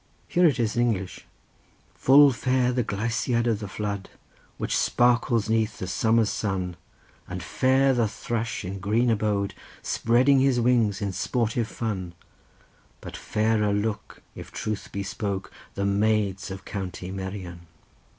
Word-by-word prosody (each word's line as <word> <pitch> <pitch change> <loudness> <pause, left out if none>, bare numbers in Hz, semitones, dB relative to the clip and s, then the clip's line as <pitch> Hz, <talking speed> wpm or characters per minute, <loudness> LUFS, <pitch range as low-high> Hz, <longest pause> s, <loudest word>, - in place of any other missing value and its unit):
Here 175 0 +4
it 135 -5 +1
is 110 -2 0
in 120 - +2
English: 100 -6 -2 0.7
"'Full 140 +1 +6
fair 125 0 +1
the 125 -1 0
gleisiad 115 +3 -1
in 115 -2 +2
the 105 0 -6
flood, 100 0 -4 0.5
Which - - -2
sparkles 120 -2 +2
'neath 110 0 0
the - - -4
summer's 110 +4 +2
sun, 95 -4 -2 0.5
And - - -6
fair 135 +1 +3
the 120 -3 +2
thrush 115 0 -3
in 95 +2 -5
green 115 +5 +2
abode 105 -2 0 0.3
Spreading 130 +4 +3
his 130 -2 +3
wings 115 -4 +2
in 100 -2 -2
sportive 115 +3 -1
fun, 95 -7 -4 0.8
But - - -9
fairer 105 -1 +1
look 105 +1 -3
if - - -10
truth 110 -2 -4
be 100 - -3
spoke, 100 -1 -4 0.2
The 100 - -1
maids 100 -1 +1
of 95 0 -8
County 95 -2 -5
Merion. 95 -3 -6
110 Hz, 140 wpm, -25 LUFS, 100-120 Hz, 0.8 s, Full